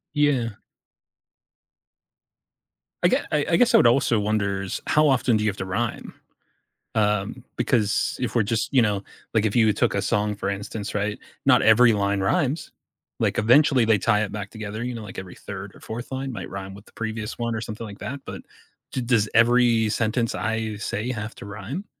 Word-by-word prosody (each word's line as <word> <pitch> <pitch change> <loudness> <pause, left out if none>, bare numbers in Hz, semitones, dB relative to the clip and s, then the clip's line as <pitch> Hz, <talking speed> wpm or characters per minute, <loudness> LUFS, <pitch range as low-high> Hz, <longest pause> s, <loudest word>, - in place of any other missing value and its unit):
Yeah. 135 -7 +1 2.5
I - - +7
ge - - +3 0.2
I 150 -1 +1
I - - +5
guess 245 -1 +4
I - - +8
would - - +6
also 120 -2 +3
wonders, 100 -2 -1
how 150 0 +4
often 125 -4 +3
do 105 - -1
you 110 - +2
have 100 - -5
to 95 - -4
rhyme? 100 +5 -3 0.8
Um, 105 +2 0
because 115 -4 +1
if 125 -2 -3
we're 120 - +4
just 110 +5 -1
you 130 - +6
know, 105 -3 0 0.3
like, 110 -1 +2
if 105 - 0
you 110 -3 +5
took - - +1
a - - +1
song, 105 0 0
for 100 - -3
instance, 100 +1 -5
right? 105 +1 -1 0.3
Not - - +6
every 115 +1 +6
line 100 -1 0
rhymes. 145 - 0 0.5
Like, - - 0
eventually, 125 +2 +5
they 110 -2 +4
tie 105 0 +2
it 105 - -4
back 100 -2 -5
together, 110 +1 -6
you 125 0 -3
know, 115 - -6
like, 95 -2 -7
every 95 -2 -9
3rd 100 0 -8
or - - -15
4th 120 +4 -7
line 135 0 -3
might 120 - -6
rhyme 95 0 -7
with 100 +2 -13
the - - -21
previous 110 -1 -4
one 115 -1 -2
or 110 - -3
something 110 0 -6
like 100 -2 -10
that, 140 +2 -5
but - - -7 0.5
d 130 - -2
does 115 -3 +2
every 115 -1 +4
sentence 115 +2 0
I 110 -1 -2
say 105 +3 -3
have 110 -2 -5
to - - -10
rhyme? 110 - -6
110 Hz, 195 wpm, -24 LUFS, 105-120 Hz, 2.5 s, I